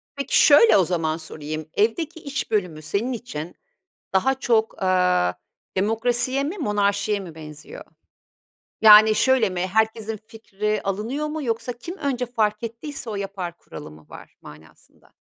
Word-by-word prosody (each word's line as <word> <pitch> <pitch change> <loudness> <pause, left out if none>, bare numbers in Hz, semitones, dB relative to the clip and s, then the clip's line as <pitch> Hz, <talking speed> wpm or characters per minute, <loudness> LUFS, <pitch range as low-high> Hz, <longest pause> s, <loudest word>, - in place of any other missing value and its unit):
Peki, 280 -1 +1
şöyle 310 - +7
o 185 - +3
zaman 160 -2 -1
sorayım. 155 -1 -7
Evdeki 315 +11 0
iş 275 -5 -5
bölümü 180 -7 -1
senin 200 +11 -2
için 175 -8 -7 0.6
daha 265 +8 +2
çok, 225 -5 0
aaa, 180 - +2 0.4
demokrasiye 240 +6 0
mi, 350 +8 -4
monarşiye 205 - 0
mi 170 -4 -9
benziyor? 150 -2 -11 1.0
Yani, 215 0 +8
şöyle 255 -4 +3
mi? 180 -1 -3
Herkesin 220 +1 0
fikri 210 -1 -3
alınıyor 225 +10 -3
mu 305 0 -4
yoksa 235 0 -2
kim 340 +11 -9
önce 265 -6 -2
fark 220 -2 -1
ettiyse 235 +2 -6
o 210 - -4
yapar 195 -3 -5
kuralı 150 - -11
mı 75 0 -16
var - - -13
manasında? 75 +1 -17
215 Hz, 140 wpm, -23 LUFS, 180-245 Hz, 1.0 s, Yani